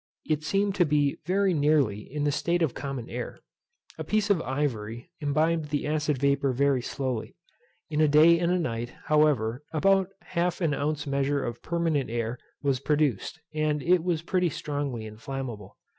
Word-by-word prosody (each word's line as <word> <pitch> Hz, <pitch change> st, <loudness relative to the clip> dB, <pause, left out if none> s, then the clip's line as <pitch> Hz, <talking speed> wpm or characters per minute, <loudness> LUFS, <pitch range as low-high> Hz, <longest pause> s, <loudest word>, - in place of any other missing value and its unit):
It 155 Hz, -1 st, 0 dB
seemed 195 Hz, +5 st, +1 dB
to -, -, +9 dB
be 145 Hz, -2 st, +1 dB
very 195 Hz, +1 st, +2 dB
nearly 145 Hz, -9 st, +2 dB
in 145 Hz, +7 st, -5 dB
the 145 Hz, -, +2 dB
state 170 Hz, +4 st, +1 dB
of 150 Hz, -, 0 dB
common 135 Hz, -4 st, -5 dB
air. -, -, -5 dB, 0.6 s
A -, -, -2 dB
piece 210 Hz, +5 st, +1 dB
of 180 Hz, -5 st, +3 dB
ivory 120 Hz, -5 st, -3 dB
imbibed 155 Hz, +1 st, +1 dB
the 145 Hz, -1 st, -1 dB
acid 150 Hz, -1 st, 0 dB
vapour 140 Hz, 0 st, +2 dB
very 140 Hz, 0 st, +2 dB
slowly. 130 Hz, -2 st, -3 dB, 0.5 s
In 155 Hz, -1 st, 0 dB
a 155 Hz, -, +5 dB
day 155 Hz, +3 st, +6 dB
and 175 Hz, 0 st, +1 dB
a 180 Hz, -, +3 dB
night, 120 Hz, -7 st, -3 dB
however, 145 Hz, -6 st, +2 dB
about 190 Hz, +4 st, +3 dB
half 175 Hz, 0 st, -1 dB
an 165 Hz, -5 st, +1 dB
ounce 150 Hz, +1 st, -1 dB
measure 140 Hz, 0 st, 0 dB
of 120 Hz, -1 st, -5 dB
permanent 165 Hz, -4 st, 0 dB
air 115 Hz, +1 st, -2 dB, 0.2 s
was 135 Hz, -2 st, +1 dB
produced, 150 Hz, -1 st, 0 dB
and 155 Hz, -1 st, 0 dB
it 175 Hz, -1 st, +3 dB
was 170 Hz, -3 st, 0 dB
pretty 180 Hz, 0 st, +1 dB
strongly 145 Hz, -7 st, -3 dB
inflammable. 110 Hz, -2 st, -7 dB
145 Hz, 170 wpm, -27 LUFS, 130-165 Hz, 0.6 s, to